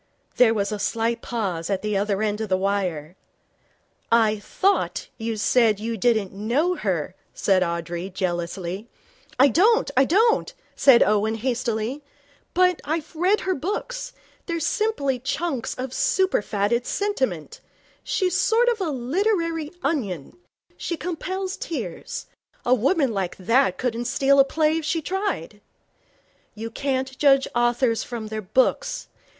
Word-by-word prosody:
There 230 -3 +5
was 200 0 -1
a 210 - -3
slight 230 +2 -1
pause 190 -8 -3
at 195 0 -1
the 210 -1 -1
other 200 +1 0
end 210 0 -1
of 220 - -3
the 185 - +2
wire. 185 -5 -2 1.0
'I 220 -2 +4
thought 390 - 0
you 225 0 -3
said 220 -1 +3
you 225 +2 -3
didn't 220 -3 +1
know 240 - +1
her,' 185 - -2 0.2
said 190 -2 +2
Audrey, 170 +1 -2
jealously. 180 +2 -3 0.5
'I 275 +2 +6
don't 410 - +3
I 265 +1 +5
don't,' 440 - +2 0.2
said 265 -4 +6
Owen, 210 +2 +1
hastily. 240 +2 -2 0.5
'But 360 -1 +3
I've 320 +1 -3
read 370 +6 +2
her 375 - 0
books. 465 - -4 0.3
They're 335 -1 -1
simply 300 - 0
chunks 280 0 -2
of 255 0 -5
superfatted 235 - +1
sentiment. 260 - -2 0.4
She's 370 -3 0
a - - +2
sort 475 +2 +3
of 470 -2 0
literary 330 - -1
onion. 205 - -2 0.4
She 340 - -3
compels 370 +4 -4
tears. 225 - -5 0.4
A 245 - +4
woman 265 - +2
like 190 -3 -2
that 230 +2 +2
couldn't 240 -1 -2
steal 275 +3 +3
a 270 - +7
play 310 +2 +1
if - - -7
she 320 +2 0
tried.' 385 +5 -3 0.9
'You 225 +1 -6
can't 265 +1 -2
judge 275 -2 +5
authors 240 -1 +2
from 230 -3 -6
their 215 0 -4
books. 265 - 0
245 Hz, 140 wpm, -24 LUFS, 210-325 Hz, 1.0 s, a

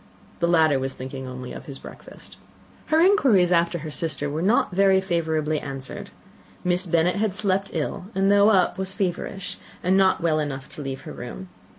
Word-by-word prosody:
The 170 - +2
latter 160 -5 +4
was 135 0 -3
thinking 130 0 -7
only 125 0 -7
of - - -10
his 140 -2 -7
breakfast. - - -11 0.5
Her 315 - +3
inquiries 265 - +4
after 170 0 +2
her 155 -1 -7
sister 145 -2 -2
were 155 +2 -2
not 210 +3 +2
very 190 +1 +4
favourably 160 -4 -1
answered. 135 -2 -7 0.5
Miss 180 +1 0
Bennet 170 +3 +2
had 210 -2 0
slept 195 -1 +1
ill, 165 +3 -3
and 195 +1 +3
though 205 +1 +6
up, 190 -3 +2
was 190 0 -4
very 190 -4 +1
feverish, 195 +2 -7 0.2
and 185 +2 +3
not 190 -1 +4
well 160 -2 +1
enough 140 -3 -4
to - - -9
leave 135 -1 -5
her - - -9
room. 150 +10 -8
170 Hz, 190 wpm, -24 LUFS, 145-190 Hz, 0.5 s, though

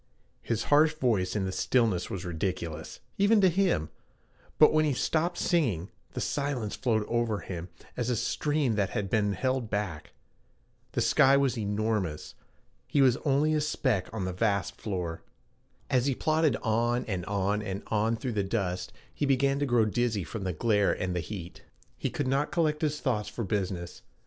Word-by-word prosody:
His 115 -1 -1
harsh 155 +1 +4
voice 110 -11 +1
in 100 -2 0
the 95 - -2
stillness 110 -4 +1
was 95 -1 -5
ridiculous, 85 -2 -4 0.2
even 205 +2 +5
to 190 - +6
him, 175 - +1 0.7
but 155 - +7
when 155 0 +4
he 150 -2 +1
stopped 165 +7 0
singing, 115 - 0 0.2
the - - -4
silence 140 -7 -2
flowed 110 -5 0
over 115 -3 0
him 90 -1 -6 0.3
as 125 -1 -2
a 125 - +1
stream 140 +3 0
that 105 -2 0
had 100 -2 -3
been 105 -2 +2
held 130 +2 -1
back. 100 -8 -3 0.8
The - - 0
sky 135 +1 +5
was 135 -3 +2
enormous; 105 -6 -2 0.5
he 145 - 0
was 130 -3 +5
only 150 +2 +2
a 155 - +2
speck 130 -9 0
on 100 -4 -3
the 95 - -3
vast 100 -1 0
floor. 90 -6 -3 0.7
As 130 +1 +2
he 135 - +1
plodded 155 -3 +2
on 120 +2 +1
and 95 -4 -3
on 100 +1 0
and 100 -1 -4
on 110 +1 +1
through 120 +1 -3
the 105 -2 0
dust, 95 -3 -2 0.2
he 145 - -1
began 135 +1 +2
to 145 - 0
grow 120 -3 +3
dizzy 110 -2 0
from 95 +5 -6
the 95 - 0
glare 105 +3 +2
and 90 -1 -3
the - - 0
heat. 85 0 -7 0.3
He - - -2
could 145 - -2
not 135 +3 +1
collect 155 -3 +1
his 150 -1 0
thoughts 105 -6 -1
for 115 - -4
business. 90 -3 -3
110 Hz, 180 wpm, -29 LUFS, 95-140 Hz, 0.8 s, but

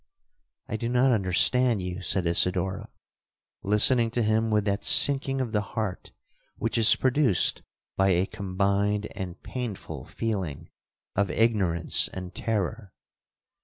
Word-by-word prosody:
'—'I 110 - -4
do 115 +2 -3
not 125 +2 +2
understand 115 +3 +2
you,' 90 0 -5
said 90 +1 -1
Isidora, 90 +2 0 0.7
listening 115 +4 +4
to 120 +1 -1
him 110 +1 +1
with 105 -2 +1
that 100 0 -2
sinking 135 -1 +3
of 125 -4 -3
the 105 -2 0
heart 105 -2 -5 0.5
which 115 - -3
is 115 -2 +7
produced 130 -6 +2 0.4
by 95 0 +3
a 90 0 +2
combined 100 +1 -1
and 95 -3 -7
painful 100 - -6
feeling 95 -10 -5 0.4
of 100 0 0
ignorance 95 -8 +1
and 90 -1 -8
terror. 110 -1 -3
105 Hz, 130 wpm, -26 LUFS, 95-115 Hz, 0.7 s, is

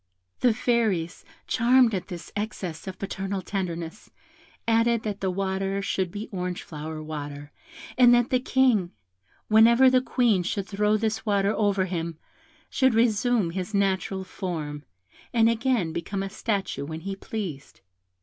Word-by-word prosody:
The 250 - +4
fairies, 220 -9 0 0.2
charmed 245 0 +4
at 185 - -3
this 175 -3 -8
excess 200 -5 -4
of 185 -1 -6
parental 195 0 -4
tenderness, 175 -1 -4 0.6
added 230 0 +3
that 205 -2 -3
the 190 - 0
water 195 +1 -1
should 190 -2 -1
be 205 +4 -6
orangeflower 160 -4 -5
water, 145 -1 -7 0.5
and 245 -1 +8
that 240 0 +1
the 255 - +3
King, 250 -8 +2 0.5
whenever 235 +4 +6
the 255 0 +4
Queen 240 -7 +2
should 190 +2 -2
throw 210 +1 +1
this 220 0 -1
water 200 -1 +1
over 200 -3 +1
him, 170 -3 -4 0.5
should 260 -3 +2
resume 225 -4 +2
his 185 +4 -4
natural 195 -1 0
form, 155 -7 -5 0.5
and 225 -1 +5
again 230 -8 0
become 195 +4 -3
a 195 - -5
statue 200 -7 -2
when 160 +2 -6
he 195 +2 -4
pleased. 190 -9 -6
195 Hz, 140 wpm, -26 LUFS, 180-225 Hz, 0.6 s, and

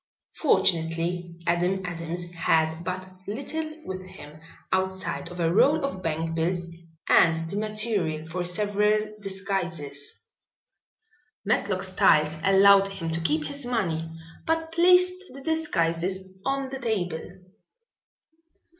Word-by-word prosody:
Fortunately 175 - +1
Adam 180 +2 +1
Adams 175 0 -4
had 160 -1 +1
but 185 +1 -4 0.2
little 310 +8 -4
with 185 0 -5
him 155 -5 -12 0.3
outside 190 -2 -1
of 175 0 -9
a 165 0 +2
roll 290 - +4
of 190 -9 -4
bankbills 165 +2 -1 0.4
and 165 -1 +4
the 170 - -5
material 210 -7 -1
for 175 +3 -3
several 210 +3 +1
disguises. 180 -8 -3 1.3
Matlock 195 -2 0
Styles 185 -5 +3
allowed 195 0 +6
him 190 -4 -5
to 165 +1 -2
keep 155 -1 +1
his 280 - -4
money 175 -10 -1 0.4
but 325 0 0
placed 360 +2 +5
the 275 - -10
disguises 190 - 0
on 275 0 -1
the 265 0 -6
table. 190 -9 -2
185 Hz, 110 wpm, -26 LUFS, 165-215 Hz, 1.3 s, allowed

